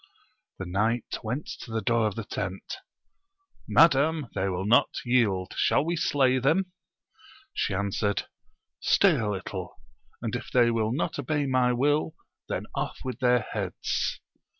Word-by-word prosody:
The 95 - -5
knight 105 +6 -1
went 125 +7 -3
to - - -9
the 110 0 -1
door 115 0 +2
of 105 - -4
the 115 - -4
tent 95 - -5 0.4
— 390 0 -39
Madam, 150 -2 +5
they 95 0 -1
will 90 +1 -2
not 115 +4 +5 0.2
yield: 105 -7 +1
shall - - +2
we 170 +1 0
slay 135 -5 +2
them? 170 +8 +1 0.8
She 95 - -1
answered, 100 0 -1 0.6
Stay - - +4
a 110 -2 -1
little, 95 -2 -5 0.4
and - - -3
if - - -5
they 120 -2 +4
will 110 -1 0
not 130 - -2
obey 150 -2 0
my 130 -2 +2
will, 145 +5 +1 0.3
then - - -2
ofif - - -2
with 130 - -4
their 125 -1 +3
heads. - - -3
120 Hz, 150 wpm, -27 LUFS, 105-145 Hz, 0.8 s, Madam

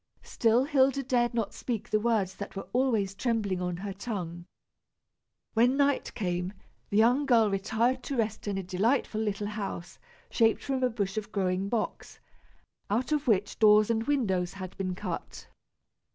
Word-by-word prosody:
Still 230 +2 +2
Hilda 275 -1 +2
dared 240 -2 +1
not 225 -3 -1
speak 235 -5 -4
the 215 - +3
words 210 -4 +1
that 200 - -7
were 195 - -6
always 230 -6 +1
trembling 205 -4 -1
on 180 -1 -2
her 195 +2 -5
tongue. 180 -5 -5 1.1
When 245 +4 +3
night 285 -1 +2
came, 180 -2 -2 0.4
the 200 - 0
young 250 +6 +4
girl 225 -4 +4
retired 225 +6 0
to 275 - -3
rest 215 -2 -2
in 200 -1 -1
a 195 - -3
delightful 215 +5 0
little 210 -1 -2
house 205 -4 -5 0.3
shaped 225 -2 +3
from 265 -1 -1
a 255 - +3
bush 205 -3 -3
of 215 0 -4
growing 190 0 0
box, 225 -2 -3 0.7
out 235 +8 0
of 300 -2 0
which 205 -3 +1
doors 215 0 +6
and 225 0 0
windows 190 -11 0
had 185 -2 -8
been 185 -2 -3
cut. - - -6
215 Hz, 165 wpm, -29 LUFS, 195-240 Hz, 1.1 s, doors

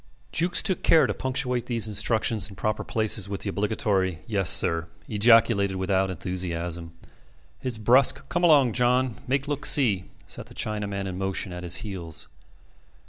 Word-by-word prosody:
Jukes 175 +2 +1
took 190 - 0
care 160 - +5
to - - -1
punctuate 125 -2 -3
these 115 -3 -1
instructions 110 0 -1
in 100 - -12
proper 110 +3 -2
places 110 -3 0
with 100 -1 -5
the 100 - -3
obligatory 100 -4 -1
"Yes, 100 -6 0
sir," 80 0 +2 0.2
ejaculated 105 -2 +4
without 95 0 0
enthusiasm. 85 -2 -4 0.7
His 125 -4 -3
brusque 130 +5 +4
"Come 175 0 -2
along, 145 -8 +5
John; 125 -1 +1
make 135 +2 -1
look 145 -1 -3
see" 105 -10 +3 0.2
set - - -8
the - - -15
Chinaman 100 -2 -3
in 95 -1 -5
motion 95 -1 -3
at 90 - -7
his 90 0 +2
heels. 85 -6 -4
105 Hz, 155 wpm, -25 LUFS, 95-125 Hz, 0.7 s, care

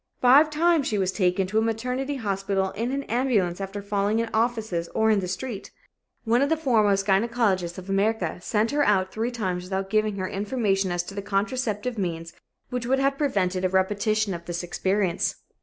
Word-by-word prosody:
Five 275 +5 +6
times 320 -1 +2
she 210 - 0
was 190 -1 +1
taken 185 -1 +1
to 210 +4 0
a - - +2
maternity 250 +5 -2
hospital 195 -4 -1
in 235 +4 -3
an 275 +1 -2
ambulance 220 -9 0
after 195 +1 -5
falling 205 +1 0
in 230 0 -1
offices 220 -7 0
or 220 0 +3
in 210 - +3
the 185 - -3
street. 195 +3 -5 0.5
One 235 +2 +2
of 280 - +2
the 320 - +2
foremost 215 -9 +2
gynecologists 195 -4 +1
of 185 0 -8
America 195 -3 0
sent 215 +4 0
her 290 0 +2
out 190 -5 +2
three 225 +2 -2
times 185 -7 -3
without 190 +1 -3
giving 215 -1 +1
her 185 -1 -3
information 200 -2 0
as 175 0 -1
to 195 - -9
the 200 - -4
contraceptive 215 +3 -2
means 165 -3 -3 0.4
which 250 -1 -3
would 265 +2 +2
have 275 +1 +1
prevented 190 -10 0
a 185 - +2
repetition 205 +2 +1
of 170 -1 -7
this 175 0 -4
experience. 190 +1 0
205 Hz, 190 wpm, -25 LUFS, 190-235 Hz, 0.5 s, Five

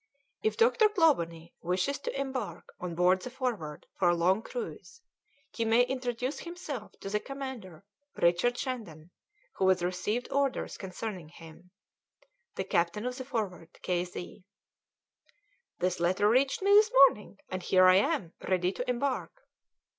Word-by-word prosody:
"If 440 0 0
Dr. 455 -1 +5
Clawbonny 170 - +1
wishes 185 +11 -1
to 275 - -4
embark 265 -1 -4
on 175 -2 -5
board 180 +2 +3
the 250 - -6
Forward 235 - -4
for 180 - +4
a 175 - +3
long 185 +5 +2
cruise, 465 - -7 0.5
he 230 - -2
may 225 +2 +4
introduce 250 +1 -3
himself 325 - -7
to 195 - -5
the 210 - +1
commander, 255 - -7 0.3
Richard 175 +8 +2
Shandon, 180 - -5 0.5
who 190 - +3
has 185 -2 +3
received 185 +7 -2
orders 275 -1 0
concerning 185 -3 -6
him. 165 +2 -14 0.9
"THE - - -2
CAPTAIN 175 +6 0
OF 250 0 -2
THE 260 - -5
'FORWARD,' 195 -9 -4
"K. 180 -1 0
Z." 180 +1 -9 1.3
"This 180 0 -1
letter 185 +4 +2
reached 265 - +2
me 400 - +3
this 420 +2 +7 0.2
morning, 210 -6 -2
and 185 0 -3
here 185 +1 +4
I 185 0 +7
am, 205 - 0
ready 180 -1 +1
to 250 +5 -5
embark." 275 - -2
210 Hz, 145 wpm, -30 LUFS, 180-265 Hz, 1.3 s, this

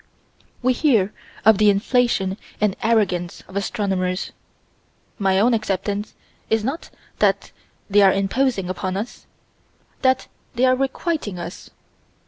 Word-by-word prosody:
We 255 +1 +4
hear 230 -8 +2 0.3
of 220 -2 +6
the 210 -1 +6
inflation 205 -2 +1 0.2
and 205 -2 +1
arrogance 190 -6 0
of 190 - -13
astronomers. 195 -3 -1 0.9
My 190 -1 +3
own 235 +4 +4
acceptance 205 -1 -2 0.3
is 220 -1 +2
not 270 +8 -3 0.3
that - - +2 0.4
they 205 0 +4
are 195 -1 +7
imposing 195 +1 0
upon 185 +1 -3
us: 215 +5 -6 0.7
that 260 -1 +2 0.3
they 245 +2 +3
are 255 0 +4
requiting 270 - -2
us. 175 +2 -8
205 Hz, 120 wpm, -22 LUFS, 190-245 Hz, 0.9 s, are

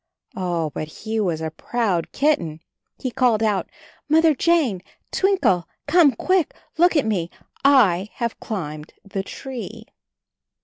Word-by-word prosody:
Oh, 170 -4 -1
but 155 - -4
he 220 +7 -4
was 170 -6 0
a 160 0 -3
proud 195 -2 -1
kitten. 170 - 0 0.4
He 255 - -4
called 240 -4 +2
out, 210 -3 0 0.4
"Mother 320 +1 +5
Jane, 285 - +2 0.3
Twinkle, 375 - +2 0.2
come 295 -2 +5
quick! 370 +5 +1 0.2
Look 350 +1 +5
at 295 - +3
me 185 -6 -1 0.3
— - - -31 0.2
I 185 +3 -3
have 235 -2 -3
climbed 155 -7 -5
the 195 0 -3
tree." 225 0 -8
220 Hz, 135 wpm, -22 LUFS, 175-285 Hz, 0.4 s, Mother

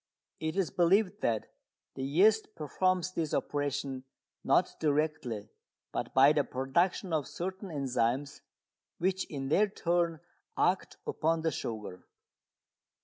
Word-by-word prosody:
It 160 +1 -2
is 195 -3 0
believed 195 +4 +3
that 110 -2 -1 0.4
the - - -6
yeast 205 +11 +3
performs 185 +4 0
this 160 -4 -1
operation 145 -2 -2 0.4
not - - +2
directly, 145 -8 -1 0.4
but - - -3
by 135 +3 +7
the 145 -1 +2
production 165 +8 0
of 150 -4 0
certain 190 +2 -5
enzymes, 135 -2 -1 0.6
which 185 +1 0
in 135 -3 -4
their 205 +7 +4
turn 170 -4 0 0.4
act - - +1
upon 160 +1 0
the 160 - +2
sugar. 105 -8 -6
155 Hz, 120 wpm, -31 LUFS, 135-180 Hz, 0.6 s, by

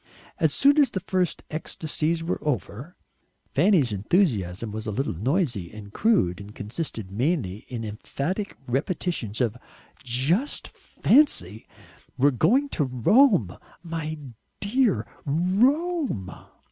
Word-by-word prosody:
As 160 -2 +3
soon 280 - +4
as 285 - +5
the 190 - -3
first 185 -2 -1
ecstasies 160 +1 -2
were 170 - -2
over 145 - -3 0.6
Fanny's 155 - +3
enthusiasm 105 - 0
was 110 +1 -5
a - - -1
little 135 +7 -1
noisy 120 - -1
and 105 -1 -11
crude, 135 - +2
and 105 +1 -11
consisted 110 - -5
mainly 110 - -1
in 120 -3 -5
emphatic 140 - -4
repetitions 135 - -2
of 115 -2 +1 0.5
"Just 140 - +1
FANCY! 110 - +1 0.5
we're 140 +3 +4
going 225 - +3
to 155 - 0
Rome, 130 - +4 0.3
my 160 -2 -4 0.4
dear! 225 +1 +1 0.2
Rome!" 205 - +1
150 Hz, 115 wpm, -25 LUFS, -, 0.6 s, as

